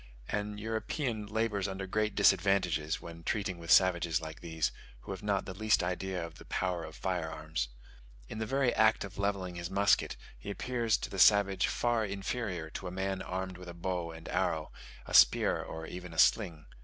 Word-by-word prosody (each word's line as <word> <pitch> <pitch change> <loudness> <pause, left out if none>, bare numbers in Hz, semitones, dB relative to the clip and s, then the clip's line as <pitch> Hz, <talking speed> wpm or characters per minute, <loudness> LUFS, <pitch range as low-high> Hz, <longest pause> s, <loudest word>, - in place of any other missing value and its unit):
An 105 0 -2
European 110 +1 -2
labours 105 -2 0
under 95 0 -4
great 105 +3 -1
disadvantages 90 -6 +3
when 85 0 -9
treating 95 0 -2
with 85 0 -9
savages 85 -4 +5
like 80 -1 -8
these, 80 -2 -1 0.3
who - - -8
have 95 - -5
not 100 -2 0
the 95 - -6
least 110 0 +2
idea 90 0 -2
of 80 -2 -11
the - - -12
power 90 -2 -1
of 80 -1 -9
fire 90 -3 -2
arms. 75 -5 -3 0.6
In 110 - -6
the 110 - -2
very 135 -1 +2
act 110 0 +4
of 100 0 -9
levelling 95 -3 -1
his 85 0 -4
musket 100 +1 +2 0.2
he 60 - -8
appears 115 +1 0
to - - -6
the 95 - -4
savage 100 -1 +5
far 120 -2 +1
inferior 100 -4 -3
to 95 - -5
a - - -4
man 95 +1 -2
armed 95 0 -4
with 90 -1 -9
a 85 - -8
bow 90 -1 -2
and 80 0 -10
arrow, 80 -4 0 0.3
a - - -8
spear, - - +6
or 80 0 -6
even 90 0 -8
a - - -10
sling. 85 -6 +3
95 Hz, 195 wpm, -32 LUFS, 85-105 Hz, 0.6 s, spear